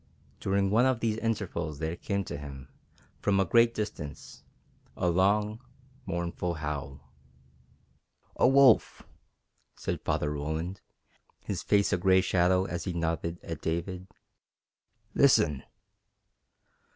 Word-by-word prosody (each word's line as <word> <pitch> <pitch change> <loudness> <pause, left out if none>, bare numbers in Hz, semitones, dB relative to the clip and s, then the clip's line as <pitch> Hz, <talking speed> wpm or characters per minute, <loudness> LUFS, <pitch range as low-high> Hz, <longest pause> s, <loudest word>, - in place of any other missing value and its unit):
During 100 0 +1
one 120 +5 +4
of 130 -3 +1
these 110 -2 0
intervals 95 -9 -2
there 80 +2 -3
came 100 +2 -2
to - - -7
them, 70 -2 -8 0.5
from 100 -1 +1
a 95 - +3
great 115 +6 +4
distance, 90 -9 -6 0.6
a 90 - 0
long, 105 +4 +2 0.5
mournful 85 0 -2
howl. 75 -2 -5 1.3
"A - - +4
wolf!" 135 -2 +5 0.7
said - - -4
Father 75 - -1
Roland, 80 +5 -4 0.6
his - - -3
face 100 -1 +2
a - - +3
gray 95 +1 +4
shadow 95 0 +2
as 85 -2 -4
he 90 - -2
nodded 85 0 -2
at 80 -2 -6
David. 90 +3 -3 1.1
"Listen!" 80 - +4
90 Hz, 115 wpm, -29 LUFS, 80-100 Hz, 1.3 s, wolf